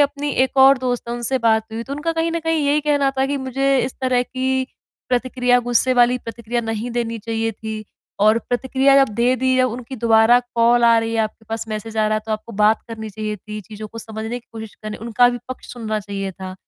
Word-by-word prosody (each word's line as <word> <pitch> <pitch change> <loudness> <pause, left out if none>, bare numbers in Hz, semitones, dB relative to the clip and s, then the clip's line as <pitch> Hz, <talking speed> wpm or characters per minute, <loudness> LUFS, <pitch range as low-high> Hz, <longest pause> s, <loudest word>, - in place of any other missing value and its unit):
अपनी 290 0 +1
एक 265 - -6
और 270 0 +7
दोस्त 245 -2 -2
है 235 - -2
उनसे 240 +2 -1
बात 220 -2 +2
हुई 225 +1 -4
तो 270 - -8
उनका 295 +4 -2
कहीं 330 0 0
न 335 - 0
कहीं 325 -2 0
यही 290 +1 +3
कहना 285 -2 +2
था 265 - +3
कि 285 +1 -1
मुझे 270 +1 0
इस 255 - -5
तरह 255 -1 +2
की 260 +1 -1 0.4
प्रतिक्रिया, 250 0 +2
गुस्से 245 +1 +2
वाली 245 0 +4
प्रतिक्रिया 235 +1 -4
नहीं 225 +1 -3
देनी 230 -1 -2
चाहिए 225 +1 -2
थी 220 0 -6 0.4
और 215 +2 +5
प्रतिक्रिया 265 +2 +2
जब 215 - -9
दे 240 +3 +2
दी 260 +1 +1
या 255 - +4
उनकी 250 +2 -6
दोबारा 225 +1 +5 0.2
कॉल 235 +1 +4
आ 230 0 +6
रही 225 0 -2
है, 225 - +2
आपके 220 0 -4
पास 225 0 -4
मैसेज 215 +1 -5
आ 215 0 +2
रहा 215 - +1
है, - - -2
तो 220 - -2
आपको 215 +2 -5
बात 215 +1 +3
करनी 220 -1 -6
चाहिए 215 +1 -4
थी, 210 +2 -8
चीज़ों 210 +2 -9
को 230 - -10
समझने 220 +2 -5
की - - -38
कोशिश 220 -1 -8
करनी 215 0 -5
उनका 245 +2 +4
भी 245 0 -2
पक्ष 255 - -8
सुनना 220 -3 -3
चाहिए 195 -1 -5
था। 185 0 -8
235 Hz, 235 wpm, -20 LUFS, 220-260 Hz, 0.4 s, और